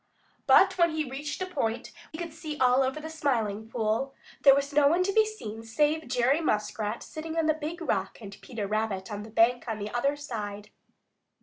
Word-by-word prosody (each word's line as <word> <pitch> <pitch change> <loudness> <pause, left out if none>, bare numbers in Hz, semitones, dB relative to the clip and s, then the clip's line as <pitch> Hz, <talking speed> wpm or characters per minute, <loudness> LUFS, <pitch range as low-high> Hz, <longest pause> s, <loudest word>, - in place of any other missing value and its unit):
But 380 -1 +6
when 340 0 +5
he 310 -2 -1
reached 290 +6 -4
a - - -2
point 255 -11 -2
where 340 0 -19
he - - -6
could 335 -2 -5
see 305 -2 -6
all 255 0 +4
over 265 +3 0
the 310 - -7
Smiling 230 -9 -1
Pool, 230 +4 -1 0.3
there 275 -1 +8
was 280 +1 -1
no 290 -1 +5
one 340 +5 +3
to 395 +1 -1
be 435 0 +4
seen 225 - -7
save 295 +8 0
Jerry 255 +5 +2
Muskrat 210 -4 -1
sitting 320 +1 -6
on 325 - +2
the 310 - +4
Big 315 +3 -6
Rock 195 -10 -1
and 200 -3 -9
Peter 230 -6 -5
Rabbit 210 -1 -2
on 205 0 -4
the 215 - -9
bank 230 +3 +3
on 225 -2 -2
the 210 0 -5
other 275 +4 +1
side. 210 -7 -6
265 Hz, 210 wpm, -28 LUFS, 220-310 Hz, 0.3 s, there